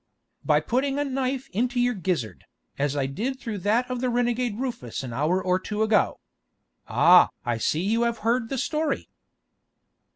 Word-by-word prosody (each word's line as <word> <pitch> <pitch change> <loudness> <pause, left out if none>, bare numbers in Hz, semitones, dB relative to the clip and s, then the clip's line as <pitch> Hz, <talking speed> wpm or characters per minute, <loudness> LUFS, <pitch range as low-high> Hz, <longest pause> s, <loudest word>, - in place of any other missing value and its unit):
"By - - +3
putting 270 +3 0
a 290 - +1
knife 270 -1 -2
into 245 +5 0
your 245 0 +2
gizzard, 170 - -3 0.3
as 145 0 0
I 135 - +1
did 225 - -3
through 225 -6 -5
that 220 +6 +1
of 250 -1 -4
the 255 - +1
renegade 240 -2 0
Rufus 245 - -4
an 125 -3 -6
hour 155 +9 +1
or 185 0 +1
two 210 +3 -2
ago! 215 -2 +2 0.7
Ah! - - +6 0.2
I 120 -1 -1
see 155 +8 0
you 220 +5 +1
have 235 -1 +1
heard 230 0 +1
the 270 - -2
story." 305 +5 -1
230 Hz, 170 wpm, -25 LUFS, 185-255 Hz, 0.7 s, Ah